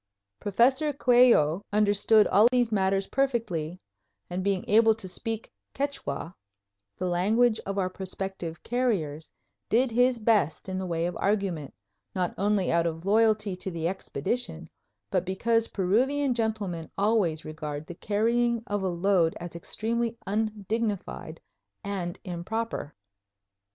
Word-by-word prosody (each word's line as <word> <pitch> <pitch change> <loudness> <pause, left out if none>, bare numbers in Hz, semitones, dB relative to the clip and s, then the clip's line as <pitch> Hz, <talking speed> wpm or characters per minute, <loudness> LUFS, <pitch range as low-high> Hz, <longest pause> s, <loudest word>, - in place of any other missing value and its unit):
Professor 260 +9 +2
Coello 240 - +4
understood 210 +1 +4
all 210 +4 +5
these 245 -2 +2
matters 195 -1 +1
perfectly 215 - -1 0.5
and, 185 +1 -2
being 195 -2 0
able 220 +1 +5
to 210 -4 -6
speak 225 +4 -5 0.2
Quichua, 225 - -3 0.6
the - - -3
language 215 +6 +2
of 195 0 -3
our 190 -2 +1
prospective 185 -2 -5
carriers, 190 - -1 0.4
did 240 +2 +3
his 245 +2 +3
best 210 -9 +1
in 190 0 -3
the 190 - -3
way 165 -1 -1
of 175 - -3
argument, 195 -8 -1 0.4
not 180 -2 0
only 200 -1 +1
out 170 0 +2
of 165 +1 -5
loyalty 215 -1 +3
to 190 - -5
the 165 -2 -2
Expedition, 175 - -3 0.4
but 180 - +1
because 225 +5 +1
Peruvian 255 +9 +1
gentlemen 215 -8 -2
always 195 -7 +1
regard 155 -1 -5
the 175 - -8
carrying 230 +5 +1
of 205 0 -2
a 190 - 0
load 175 -1 +2
as 170 -1 -7
extremely 230 +6 -2
undignified 210 -4 -2 0.4
and 185 -4 -3
improper. 180 -2 -4
200 Hz, 130 wpm, -27 LUFS, 175-225 Hz, 0.6 s, all